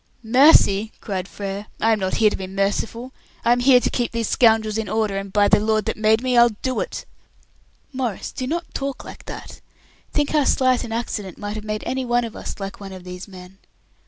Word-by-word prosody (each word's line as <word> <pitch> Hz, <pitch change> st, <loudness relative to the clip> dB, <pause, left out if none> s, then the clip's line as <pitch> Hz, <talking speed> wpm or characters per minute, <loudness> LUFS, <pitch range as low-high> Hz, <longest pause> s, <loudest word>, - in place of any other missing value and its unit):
"Mercy!" 225 Hz, -4 st, +5 dB
cried 190 Hz, -3 st, -4 dB
Frere. 200 Hz, +1 st, -6 dB
"I 225 Hz, -, +3 dB
am 220 Hz, -, +2 dB
not 190 Hz, -1 st, -1 dB
here 215 Hz, -2 st, +4 dB
to -, -, -2 dB
be 190 Hz, -, -6 dB
merciful; 205 Hz, +6 st, -2 dB, 0.3 s
I 235 Hz, -, +4 dB
am 245 Hz, -, +4 dB
here 250 Hz, 0 st, +6 dB
to -, -, -1 dB
keep 240 Hz, -2 st, -1 dB
these 230 Hz, -2 st, -2 dB
scoundrels 220 Hz, -2 st, +3 dB
in 220 Hz, -, -4 dB
order, 215 Hz, -2 st, 0 dB
and 195 Hz, 0 st, -4 dB
by 205 Hz, 0 st, +4 dB
the -, -, +5 dB
Lord 215 Hz, 0 st, +1 dB
that -, -, -1 dB
made 220 Hz, +2 st, +2 dB
me, 255 Hz, -1 st, +1 dB
I'll 235 Hz, 0 st, +7 dB
do 260 Hz, -1 st, -1 dB
it!" -, -, -4 dB, 0.9 s
"Maurice, 250 Hz, -6 st, -3 dB
do 255 Hz, -2 st, -4 dB
not 335 Hz, +4 st, -3 dB
talk 275 Hz, -1 st, -4 dB
like -, -, -11 dB
that. -, -, -9 dB, 0.5 s
Think 295 Hz, -1 st, 0 dB
how 300 Hz, -3 st, +2 dB
slight 255 Hz, -2 st, +2 dB
an 225 Hz, -, -7 dB
accident 215 Hz, -5 st, -4 dB
might 205 Hz, 0 st, -5 dB
have 215 Hz, -, -6 dB
made 215 Hz, 0 st, -3 dB
any 260 Hz, 0 st, -2 dB
one 240 Hz, 0 st, +1 dB
of 225 Hz, -, -8 dB
us -, -, -7 dB
like 195 Hz, 0 st, -6 dB
one 195 Hz, -1 st, -8 dB
of 185 Hz, -1 st, -10 dB
these 180 Hz, +1 st, -8 dB
men. 185 Hz, 0 st, -13 dB
220 Hz, 220 wpm, -22 LUFS, 200-245 Hz, 0.9 s, I'll